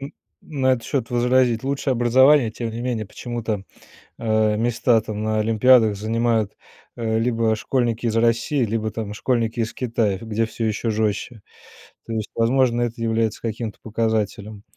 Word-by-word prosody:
н 140 +1 -7 0.3
на 135 -4 +1
этот 120 - -1
счет 130 -5 -2
возразить: 125 -1 +2
лучшее 135 0 -1
образование, 130 +1 +4
тем 115 +1 -5
не 115 +1 -6
менее, 120 -4 -2
почему-то, 110 -2 -4 0.5
э, 110 -1 +1
места 115 0 +2
там 105 -1 -5
на 110 0 0
олимпиадах 110 0 +4
занимают, 110 0 0 0.4
э, 110 -1 -1
либо 115 -1 +1
школьники 120 0 -1
из 110 - -1
России, 115 +4 +2
либо, 110 0 -2
там, 110 -1 -5
школьники 115 +1 -1
из 115 -1 -1
Китая, 115 -5 0
где 115 0 -1
всё 115 +1 -4
еще 110 +1 -1
жестче. 110 +1 -2 0.6
То 115 - -5
есть, 110 -2 -3
возможно, 120 +1 +2
это 120 -1 -3
является 115 -1 0
каким-то 110 -1 -4
показателем. 110 -2 -2
115 Hz, 155 wpm, -22 LUFS, 110-120 Hz, 0.6 s, образование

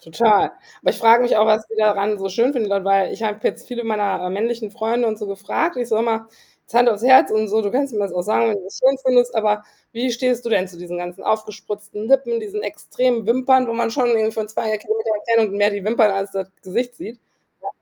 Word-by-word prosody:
Total. 210 +5 +2 0.3
Aber - - +2
ich - - -4
frag 230 +1 +6
mich 245 - +2
auch, 215 +1 +4
was 215 0 +2
die 225 - -8
daran 210 -1 +1
so 195 0 -3
schön 235 +8 +1
finden 230 -6 -1
dabei 195 -1 +2
ich - - -8
habe 210 0 -2
jetzt - - -2
viele 240 -1 -5
meiner, 205 -4 -1
äh, - - -3
männlichen 220 +2 -3
Freunde 230 +2 -1
und 215 -1 -3
so 210 - -5
gefragt. 200 - -2
Ich 245 -1 -3
so 220 - +1
immer: 225 0 -1 0.3
„Jetzt - - -21
hand 240 0 +5
aufs 215 -1 0
Herz 260 +1 +6
und 215 -1 +1
so, 220 +2 +1
du 205 - -1
kannst 275 0 0
mir 210 - -3
das 200 -1 -2
auch 180 - -2
sagen, 215 +4 +1
wenn 210 - -1
du 190 - -11
das 190 - -9
schön 270 +1 +3
findest, 245 -1 +3
aber 210 -1 0 0.3
wie 245 +2 -2
stehst 245 0 -1
du 235 - -3
denn 190 -4 +1
zu 175 -2 -15
diesen 175 0 -7
ganzen 175 0 -7
aufgespritzten 210 0 -4
Lippen, 270 - +2
diesen 420 -1 -5
extremen 245 -4 -2
Wimpern, 255 +1 +3
wo 230 - -2
man 230 0 -1
schon 250 +1 0
irgendwie 220 -2 +2
von 220 -1 -4
2 220 0 -2
Kilometer 220 +1 -3 0.2
Entfernung 225 -3 +2
mehr 205 +1 +3
die 205 -1 -5
Wimpern 220 -2 +3
als 195 0 -3
das 190 -1 -4
Gesicht 240 +6 -3
sieht?“, 235 0 -10 0.4
ja. - - -6
220 Hz, 245 wpm, -20 LUFS, 205-240 Hz, 0.4 s, frag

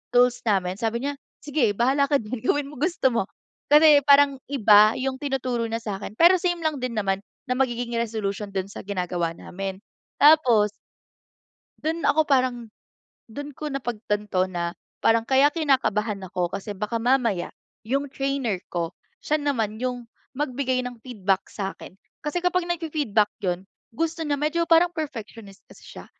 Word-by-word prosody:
tools 245 0 +4
namin 190 -1 +1
sabi 235 +2 -1
niya, 285 - -1 0.3
"sige 270 -8 +1
bahala 270 +5 +2
ka 285 - +2
din 235 +3 -5
gawin 280 +4 0
mo 280 - -11
gusto 310 -5 +1
mo." 230 -5 0 0.4
Kasi 300 0 +7
parang 280 -1 +6
iba 215 -5 +5
yung 260 0 -3
tinuturo 255 -4 -2
niya 225 0 -4
sakin, 200 -1 -5
pero 350 +7 +6
same 350 -2 -1
lang 310 -3 0
din 250 -2 -3
naman 195 -2 0 0.3
na 250 - 0
magiging 240 -2 -1
resolution 210 -3 -3
do'n 190 +1 -2
sa - - -8
ginagawa 175 -3 -2
namin. 195 +1 -6 0.4
Tapos 255 -9 +6 1.1
do'n 325 +2 -2
ako 315 0 +3
parang, 255 -4 +1 0.6
do'n 285 +6 -7
ko 305 - -4
napagtanto 210 -6 -1
na 175 -2 -4 0.2
parang 225 0 +3
kaya 270 +3 +5
kinakabahan 235 - 0
ako 180 -2 -1
kasi 200 0 -5
baka 210 +3 -2
mamaya 235 -7 +1 0.4
yung 275 +4 -1
trainer 270 -6 -1
ko 170 -1 -3 0.3
siya 305 - +1
naman 230 -8 -1
yung 250 -2 -3 0.3
magbigay 260 -3 -1
ng 245 -2 -8
feedback 200 -6 -1
sa'kin. 195 -1 -7 0.2
Kasi 300 +4 -2
kapag 360 -1 +1
nag-fi-feedback 300 -11 0
'yun 180 0 -2 0.3
gusto 330 0 -1
niya 295 -2 -1
medyo 305 +4 0
parang 340 +1 +5
perfectionist 225 - -7
kasi - - -17 0.2
siya. - - -9
245 Hz, 155 wpm, -24 LUFS, 210-285 Hz, 1.1 s, Kasi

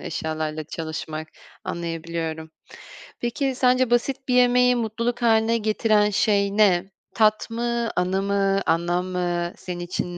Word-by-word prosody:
eşyalarla 155 -1 -4
çalışmak, 155 0 -6 0.4
anlayabiliyorum. 165 -1 -4 0.7
Peki, 260 +2 -1
sence 255 -1 +3
basit 265 +3 0
bir 250 - +1
yemeği 250 0 +4
mutluluk 235 +1 -2
hâline 225 0 +3
getiren 215 -1 +2
şey 200 -1 +1
ne? 190 -3 +3 0.2
Tat 215 0 +2
mı, 235 0 -1
anı 185 +2 0
mı, 195 0 +1
anlam 175 +2 +1
mı, 175 -1 -2
senin 180 -1 -6
için 175 0 -4
200 Hz, 125 wpm, -23 LUFS, 175-235 Hz, 0.7 s, yemeği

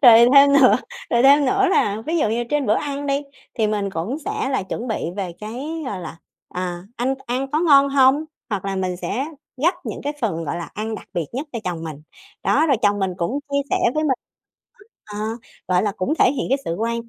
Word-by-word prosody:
Rồi 235 -1 +9
thêm 280 0 +8
nữa 275 -2 +6 0.3
rồi 235 +1 +3
thêm 280 +1 +6
nữa 390 +7 +3
là 210 - +1
ví 330 +1 0
dụ 225 - +2
như 235 +2 -1
trên 295 -3 +1
bữa 215 - +4
ăn 285 -1 -3
đi 280 +1 0 0.3
thì 220 -2 +1
mình 205 -2 -1
cũng 190 - -3
sẽ 265 - -2
là 265 -7 0
chuẩn 230 +6 -5
bị 220 - -2
về 185 -4 -3
cái, 275 +10 -5
gọi 195 -6 -4
là 165 -1 -8 0.3
"À, 180 -1 -4
anh 255 +3 0
ăn 260 +3 -2
có 305 +2 +1
ngon 280 -4 +6
hông?" 275 +2 +4 0.3
hoặc 200 -3 -2
là 195 -1 -2
mình 185 -1 -1
sẽ 255 +8 -2 0.4
gắp 350 +3 +4
những - - -4
cái 290 +1 -2
phần, 165 -8 -1
gọi 145 - -3
là, 170 -3 -5
ăn 220 +1 -3
đặc - - -10
biệt 170 -3 -1
nhất 275 +5 -4
cho 235 - -3
chồng 170 -2 -3
mình. 150 -2 -7 0.4
Đó, 310 +4 +3
rồi 275 - +3
chồng 205 0 +3
mình 190 -2 0
cũng 205 +11 -1
chia 280 - +2
sẻ - - +3 0.2
với 310 0 +1
mình, 270 - +3 0.9
ờ, 210 -1 -9 0.5
gọi 180 +1 +3
là, 205 -2 0
cũng 185 +12 -1
thể 250 - +5
hiện 280 - -2
cái 270 +2 +2
sự 165 - -2
quan 230 +1 -2
235 Hz, 230 wpm, -21 LUFS, 195-280 Hz, 0.9 s, Rồi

